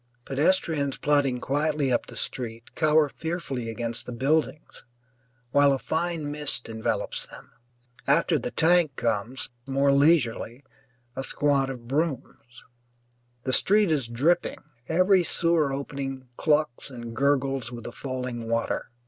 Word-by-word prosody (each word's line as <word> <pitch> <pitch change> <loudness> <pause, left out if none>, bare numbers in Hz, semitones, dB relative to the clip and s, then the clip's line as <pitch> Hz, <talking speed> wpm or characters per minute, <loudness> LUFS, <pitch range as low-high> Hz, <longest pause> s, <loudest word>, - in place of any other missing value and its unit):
Pedestrians 145 -1 +1
plodding 140 -4 +2
quietly 145 +1 0
up - - 0
the - - -10
street 115 -2 -5
cower 155 -1 +4
fearfully 140 -6 -4
against 115 +1 -4
the - - -5
buildings, 145 +5 -1 0.7
while 145 0 +5
a - - +1
fine 160 0 -2
mist 150 -4 -3
envelops 110 0 -2
them. - - -14 0.6
After - - +3
the - - -3
tank 165 -3 +3
comes, 115 +4 -2 0.2
more 135 +1 +3
leisurely, 140 -4 +2 0.5
a 135 - -3
squad 140 -1 +1
of 120 -3 -7
brooms. 135 -4 -3 0.8
The 130 - -1
street 205 +2 +4
is 140 -6 +1
dripping, 150 +10 +1 0.3
every 185 +2 +4
sewer 165 -4 +1
opening 135 -1 -5
clucks 150 -4 +1
and 120 -3 -8
gurgles 135 -2 +1
with 120 -2 -8
the - - -6
falling 125 -3 -5
water. 115 0 -1
140 Hz, 130 wpm, -26 LUFS, 125-155 Hz, 0.8 s, while